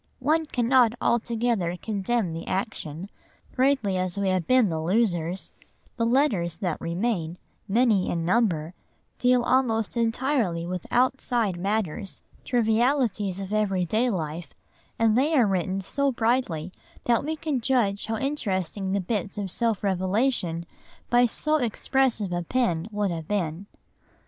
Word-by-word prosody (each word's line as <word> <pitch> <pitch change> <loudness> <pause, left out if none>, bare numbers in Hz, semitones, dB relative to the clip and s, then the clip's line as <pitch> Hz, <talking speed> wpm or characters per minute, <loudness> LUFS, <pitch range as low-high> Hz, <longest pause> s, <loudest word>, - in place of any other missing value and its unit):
One 310 +4 +1
cannot 245 -3 +3
altogether 230 -6 0
condemn 210 -3 -1
the 165 - -6
action, 185 -4 -3 0.5
greatly 255 -7 +2
as 185 0 -2
we 200 -1 +1
have 185 -3 0
been 255 -5 +4
the 160 -1 -2
losers; 180 -1 0 0.4
the 230 -2 0
letters 230 - +1
that 180 -6 -3
remain, 170 -1 -2 0.3
many 215 -2 +3
in 165 -1 -1
number, 175 -6 +1 0.5
deal 250 -1 +3
almost 235 -4 +1
entirely 230 - 0
with 180 0 -5
outside 245 -5 +1
matters, 195 0 -2 0.2
trivialities 230 -4 +1
of 195 +1 -5
everyday 215 +3 +1
life, 160 -5 -4 0.4
and 225 -1 +3
they 290 +6 +2
are 250 -5 +5
written 190 0 -1
so 280 +8 0
brightly 225 -9 0 0.3
that 235 +1 +2
we 315 +2 -2
can 300 -5 -2
judge 225 -6 +1
how 225 0 -1
interesting 195 - -2
the 200 - +1
bits 195 0 -3
of 195 -3 -3
self 225 -2 0
revelation 185 -2 0 0.5
by 245 0 +5
so 305 +6 0
expressive 240 -4 0
a 175 - -1
pen 175 -4 0
would 205 -2 -1
have 165 -2 -5
been. 190 -2 -2
210 Hz, 135 wpm, -26 LUFS, 180-245 Hz, 0.5 s, are